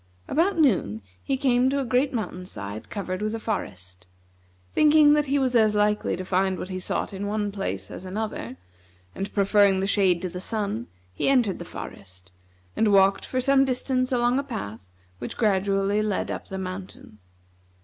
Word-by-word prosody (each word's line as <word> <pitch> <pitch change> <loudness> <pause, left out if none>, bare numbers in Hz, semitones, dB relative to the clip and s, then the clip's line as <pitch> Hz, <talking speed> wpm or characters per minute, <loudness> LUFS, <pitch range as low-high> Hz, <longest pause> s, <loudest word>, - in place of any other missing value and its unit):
About 345 +5 +1
noon 185 - +2 0.2
he 270 - -1
came 255 -1 +3
to 280 +1 0
a 270 - -1
great 255 +3 +1
mountain 210 -6 -4
side 100 - -6
covered 185 -2 -4
with 215 +1 -1
a - - -4
forest. 90 - -5 0.7
Thinking 300 -1 +6
that 295 -1 +2
he 280 +2 +2
was 260 -2 +1
as 215 -2 +4
likely 210 0 +1
to 185 +1 -6
find 190 0 +1
what 185 - -6
he 185 -1 -4
sought 185 - -3
in 200 +1 -4
one 205 0 -1
place 100 - -4
as - - -7
another, 190 - -5 0.6
and 195 +1 -5
preferring 200 -1 +4
the 190 - 0
shade 190 -3 +3
to 185 - -2
the 180 +1 -6
sun, 200 - -2 0.3
he - - 0
entered 245 -8 +2
the 175 - -7
forest, 90 - -10 0.4
and 220 -2 +2
walked 195 0 +4
for 255 - -1
some 270 +1 +4
distance 255 0 0
along 245 +1 +2
a - - -2
path 115 - -7 0.3
which - - -6
gradually 200 -1 +1
led 210 -2 -1
up - - -6
the 190 - -6
mountain. 185 - -7
205 Hz, 180 wpm, -25 LUFS, 185-250 Hz, 0.7 s, Thinking